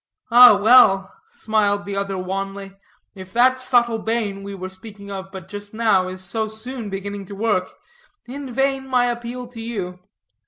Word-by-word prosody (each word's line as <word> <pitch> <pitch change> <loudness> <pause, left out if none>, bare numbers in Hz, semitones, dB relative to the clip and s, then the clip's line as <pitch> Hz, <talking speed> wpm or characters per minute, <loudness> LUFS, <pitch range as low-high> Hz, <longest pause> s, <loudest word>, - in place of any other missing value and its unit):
"Ah, 240 -3 +9
well," 200 -3 +5
smiled 205 -2 0
the 200 0 -5
other 195 -1 -2
wanly, 195 +1 -5 0.4
"if 185 -1 -11
that 255 +2 +4
subtle 240 -3 +2
bane, 215 -3 -2
we 200 0 -7
were 185 -1 -6
speaking 200 +1 -11
of 190 -1 -7
but 190 -3 -9
just 205 +1 -8
now, 215 -5 +2
is 185 0 -6
so 220 +4 -2
soon 220 +1 -6
beginning 200 +1 -5
to 200 - -9
work, 205 -3 0 0.6
in 270 +2 -7
vain 270 +1 0
my 250 -2 +2
appeal 240 +1 -4
to 240 -2 -10
you. 195 -6 -5
205 Hz, 165 wpm, -21 LUFS, 195-235 Hz, 0.6 s, Ah